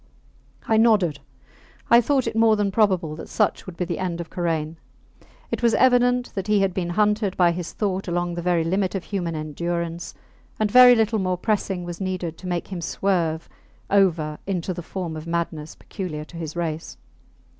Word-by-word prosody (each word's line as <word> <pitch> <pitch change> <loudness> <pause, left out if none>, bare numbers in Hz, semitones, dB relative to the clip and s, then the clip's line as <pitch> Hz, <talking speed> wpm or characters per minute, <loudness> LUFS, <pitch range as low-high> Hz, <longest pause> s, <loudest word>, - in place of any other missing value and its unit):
I 220 - +3
nodded. 205 -10 +3 0.7
I 235 +1 +8
thought 265 +1 +1
it 225 -1 -3
more 225 -1 +5
than 205 -1 0
probable 185 -7 +1
that - - -9
such 210 -2 0
would 175 -2 -9
be 180 - -1
the 170 -1 -4
end 180 -2 -2
of 170 - -7
Karain. 165 -2 -2 0.7
It - - -2
was 235 -2 +3
evident 245 -1 +3
that 195 0 -4
he 210 -1 +3
had 195 -2 +1
been 175 -2 -2
hunted 210 +1 +1
by 175 -2 +5
his 170 0 -5
thought 195 -3 -2
along 175 0 -1
the 175 - -4
very 175 -1 +1
limit 190 +3 0
of 190 - -3
human 175 -2 -3
endurance, 170 +2 -4 0.4
and 215 -1 +1
very 250 0 +9
little 220 -1 +1
more 185 -1 0
pressing 195 -2 -1
was 175 +1 -7
needed 185 -3 -3
to 185 - -8
make 175 -1 -3
him 185 -3 -5
swerve 170 -3 -1 0.4
over 170 -6 +2
into 185 -1 -2
the 175 - -6
form 175 -1 -5
of 155 +1 -7
madness 165 -2 -3
peculiar 155 -6 -6
to 170 - -12
his 160 -1 -6
race. 165 -2 -4
180 Hz, 190 wpm, -23 LUFS, 170-205 Hz, 0.7 s, very